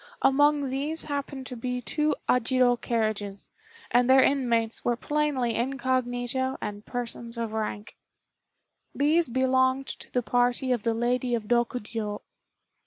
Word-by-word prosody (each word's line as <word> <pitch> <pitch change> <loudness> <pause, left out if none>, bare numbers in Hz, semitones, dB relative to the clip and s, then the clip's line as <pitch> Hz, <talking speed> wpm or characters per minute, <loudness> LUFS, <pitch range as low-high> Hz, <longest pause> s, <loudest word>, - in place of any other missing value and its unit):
Among 290 +1 +4
these 295 +4 0
happened 280 -2 -4
to 255 - -7
be 250 +1 -3
two 300 +4 0
ajiro 250 0 +3
carriages, 215 -4 -2 0.4
and 245 +1 +3
their 265 0 +7
inmates 235 -5 +1
were 240 - +1
plainly 285 -3 0
incognito 255 0 -1
and 205 0 -5
persons 235 -1 -5
of 230 -2 -3
rank. 210 -1 -4 1.0
These 310 +3 +3
belonged 260 +1 +2
to - - -9
the 250 - 0
party 245 +2 +1
of 245 -3 +1
the 225 +1 0
Lady 245 +1 0
of 225 - -3
Rokjiô. 225 -2 -1
245 Hz, 130 wpm, -27 LUFS, 230-265 Hz, 1.0 s, their